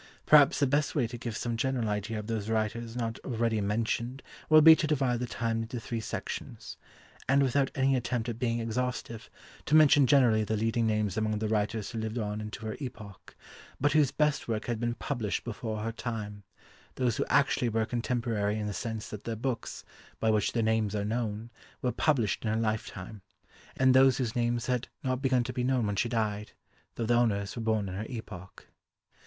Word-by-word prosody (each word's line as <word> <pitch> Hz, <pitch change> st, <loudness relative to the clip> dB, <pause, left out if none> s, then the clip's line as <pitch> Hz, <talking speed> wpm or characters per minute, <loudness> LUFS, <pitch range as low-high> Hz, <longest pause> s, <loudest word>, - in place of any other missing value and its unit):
Perhaps 150 Hz, -2 st, +6 dB
the 145 Hz, -, +4 dB
best 145 Hz, +2 st, +1 dB
way 135 Hz, -5 st, +2 dB
to 120 Hz, +2 st, -6 dB
give 115 Hz, -1 st, -5 dB
some 120 Hz, -1 st, -2 dB
general 125 Hz, -1 st, -1 dB
idea 105 Hz, +2 st, -2 dB
of 105 Hz, -, -5 dB
those 110 Hz, -1 st, -3 dB
writers 115 Hz, +1 st, -2 dB
not 115 Hz, -2 st, -3 dB
already 115 Hz, -3 st, -1 dB
mentioned 115 Hz, +5 st, -2 dB, 0.3 s
will 155 Hz, 0 st, +7 dB
be 160 Hz, 0 st, +10 dB
to 155 Hz, -, 0 dB
divide 130 Hz, -5 st, +1 dB
the 125 Hz, -, -3 dB
time 115 Hz, -1 st, -2 dB
into 115 Hz, +2 st, -5 dB
three 115 Hz, 0 st, -4 dB
sections; 110 Hz, -, -6 dB, 0.5 s
and, 140 Hz, +1 st, +5 dB
without 135 Hz, +1 st, +2 dB
any 135 Hz, -1 st, +2 dB
attempt 120 Hz, -1 st, -2 dB
at 115 Hz, -1 st, -4 dB
being 120 Hz, -2 st, 0 dB
exhaustive, 115 Hz, 0 st, -3 dB, 0.4 s
to 150 Hz, -, +3 dB
mention 145 Hz, -3 st, +6 dB
generally 120 Hz, -5 st, +4 dB
the 110 Hz, +1 st, -1 dB
leading 115 Hz, +1 st, +1 dB
names 105 Hz, -3 st, 0 dB
among 110 Hz, -1 st, 0 dB
the 110 Hz, +1 st, -2 dB
writers 105 Hz, 0 st, -1 dB
who 115 Hz, -, -4 dB
lived 110 Hz, +1 st, -3 dB
on 105 Hz, -1 st, -3 dB
into 110 Hz, +1 st, -7 dB
her 110 Hz, -, -3 dB
epoch, 115 Hz, -8 st, -9 dB, 0.4 s
but 145 Hz, +2 st, +2 dB
whose 150 Hz, -4 st, +4 dB
best 150 Hz, 0 st, 0 dB
work 110 Hz, -2 st, -2 dB
had 120 Hz, -2 st, -2 dB
been 120 Hz, 0 st, -1 dB
published 120 Hz, -8 st, -3 dB
before 110 Hz, -2 st, -4 dB
her 115 Hz, -, -2 dB
time; 110 Hz, -3 st, -5 dB, 0.5 s
those 125 Hz, -4 st, 0 dB
who -, -, 0 dB
actually 140 Hz, -3 st, +2 dB
were 110 Hz, 0 st, 0 dB
contemporary 115 Hz, -3 st, -1 dB
in 105 Hz, -, -3 dB
the 105 Hz, -, -3 dB
sense 110 Hz, 0 st, -4 dB
that 105 Hz, -, -8 dB
their 115 Hz, -, -2 dB
books, 120 Hz, +1 st, -4 dB, 0.4 s
by 110 Hz, -, +2 dB
which 105 Hz, -2 st, +1 dB
their 115 Hz, -, +1 dB
names 110 Hz, -1 st, +1 dB
are 100 Hz, -1 st, -1 dB
known, 110 Hz, 0 st, -3 dB, 0.3 s
were 125 Hz, -, +1 dB
published 120 Hz, -10 st, +1 dB
in 110 Hz, -, -1 dB
her 110 Hz, -, 0 dB
lifetime; 110 Hz, -2 st, -3 dB, 0.6 s
and 130 Hz, -1 st, +5 dB
those 130 Hz, -1 st, +6 dB
whose 120 Hz, -4 st, -2 dB
names 120 Hz, -1 st, 0 dB
had 125 Hz, -1 st, -1 dB, 0.2 s
not 130 Hz, -1 st, -1 dB
begun 130 Hz, -3 st, +2 dB
to -, -, -5 dB
be 125 Hz, -, -2 dB
known 125 Hz, -2 st, +1 dB
when 105 Hz, -1 st, -1 dB
she 120 Hz, +4 st, 0 dB
died, 105 Hz, -3 st, -2 dB, 0.4 s
though 115 Hz, -, -2 dB
the 120 Hz, -, +2 dB
owners 105 Hz, -4 st, +1 dB
were 120 Hz, -, -4 dB
born 110 Hz, -3 st, 0 dB
in 90 Hz, -, -5 dB
her 105 Hz, +4 st, -4 dB
epoch. 100 Hz, -7 st, -9 dB
115 Hz, 205 wpm, -29 LUFS, 110-125 Hz, 0.6 s, be